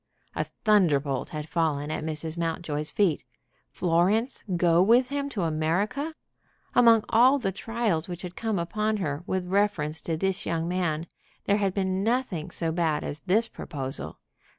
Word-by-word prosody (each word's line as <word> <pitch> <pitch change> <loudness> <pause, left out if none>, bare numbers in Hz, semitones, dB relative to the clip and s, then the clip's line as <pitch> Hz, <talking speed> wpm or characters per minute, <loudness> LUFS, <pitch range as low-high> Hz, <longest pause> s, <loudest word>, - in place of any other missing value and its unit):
A - - -1
thunder 190 -10 +3
bolt 135 -2 -3
had 155 -1 -5
fallen 155 -3 0
at 155 - -3
Mrs. 160 0 -3
Mountjoy's 165 -3 -2
feet! 185 -8 +1 0.5
Florence 185 - +1
go 170 0 +4
with 240 +6 +4
him 280 0 -2
to 205 -9 -2
America! 180 - -1 0.6
Among 230 -3 +6
all 255 +5 +6
the 195 -8 -1
trials 210 -5 -1
which 175 +1 -6
had 180 -1 -7
come 220 -3 -1
upon 215 +6 -1
her 150 -6 -2
with 185 -1 -1
reference 185 -6 0
to 165 -2 -2
this 190 +2 -1
young 165 0 -1
man 170 -3 -1 0.4
there 205 - +3
had 195 -2 0
been 190 -1 0
nothing 225 -8 -1
so 165 -1 -2
bad 160 -3 0
as 145 - -5
this 220 +5 +3
proposal. 135 -10 -6
180 Hz, 160 wpm, -27 LUFS, 160-215 Hz, 0.6 s, Among